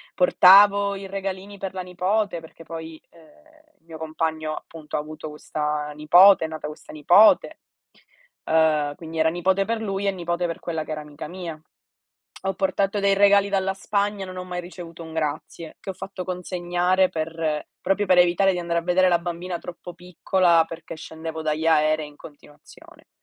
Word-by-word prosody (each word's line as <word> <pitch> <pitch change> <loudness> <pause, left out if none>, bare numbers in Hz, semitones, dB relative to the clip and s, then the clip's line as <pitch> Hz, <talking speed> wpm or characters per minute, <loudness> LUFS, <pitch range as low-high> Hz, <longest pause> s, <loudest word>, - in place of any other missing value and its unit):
portavo 200 +2 +6
i 195 0 -7
regalini 195 +1 -5
per 195 -1 -5
la 185 - -4
nipote, 185 +1 -1
perché 165 0 -14
poi, 160 -1 -8
uhm, 305 - -23
mio 165 -1 -10
compagno 160 0 -3
appunto 155 -2 -9
ha - - 0
avuto 155 +1 -8
questa 150 0 -3
nipote, 175 +5 +6
è - - -3
nata 155 -1 -6
questa 150 - -11
nipote, 175 +8 +4 0.9
uhm, 155 -2 +2
quindi 160 0 -7
era 160 - +4
nipote 185 +3 +1
per 230 +1 -2
lui 200 -2 -2
e - - +3
nipote 175 -1 -2
per 165 - -5
quella 160 -2 -4
che 155 - -9
era 155 - -4
amica 150 0 -9
mia. 170 -2 -7 0.9
Ho 195 - -1
portato 195 +1 0
dei 200 0 +3
regali 200 0 +4
dalla 195 -1 0
Spagna 200 0 -1
e - - -5
non 185 0 -9
ho 180 - -4
mai 180 -1 -5
ricevuto 175 -1 -10
un 160 -1 -10
grazie, 155 +1 -4
che 195 - -6
ho - - -11
fatto 190 0 -7
consegnare 180 0 0
per 160 -1 -3
proprio 195 +2 0
per 185 -1 +4
evitare 180 +2 +4
di 180 - -3
andare 170 -1 -1
a - - -7
vedere 180 +2 +3
la 175 -1 +3
bambina 175 0 -5
troppo 175 0 -9
piccola, 175 -1 +2
perché 165 0 -9
scendevo 160 0 -7
dagli 155 +1 -1
aerei 155 -1 +2
in 150 - -16
continuazione. 145 0 -17
175 Hz, 180 wpm, -23 LUFS, 160-190 Hz, 0.9 s, portavo